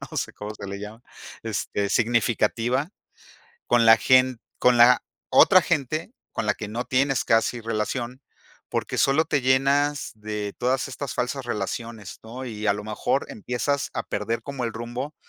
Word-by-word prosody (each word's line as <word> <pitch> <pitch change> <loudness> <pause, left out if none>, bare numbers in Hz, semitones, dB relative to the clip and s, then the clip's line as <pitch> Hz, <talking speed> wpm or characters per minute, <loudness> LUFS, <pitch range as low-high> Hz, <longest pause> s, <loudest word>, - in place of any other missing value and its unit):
no - - -7
sé - - -2
cómo 105 +1 -7
se 100 -1 -8
le 100 - -5
llama, 105 +3 -9 0.4
este, 100 -2 -2
significativa 120 - +1 0.8
con 120 -1 +4
la 115 0 +8
gen 130 -2 +4 0.2
con 125 -1 +4
la 120 +1 +7 0.3
otra 185 -2 +7
gente 155 - -1 0.2
con 115 - -3
la 105 - +2
que 105 - -6
no 120 +3 -3
tienes 135 0 +1
casi 115 +2 +2
relación, 115 +3 -3 0.5
porque - - -2
solo 145 +4 +3
te 145 -4 0
llenas 140 +2 +2
de 105 -1 -5
todas 130 +2 0
estas 135 0 -5
falsas 125 +2 -2
relaciones, 110 -2 -5
¿no? 125 +4 -8
Y 110 -3 -5
a 100 - +5
lo 105 +1 -6
mejor 110 +5 -1
empiezas 125 +6 -2
a - - -2
perder 115 +1 -3
como 140 -3 -4
el 115 - -2
rumbo 120 +6 -5
120 Hz, 165 wpm, -24 LUFS, 110-130 Hz, 0.8 s, la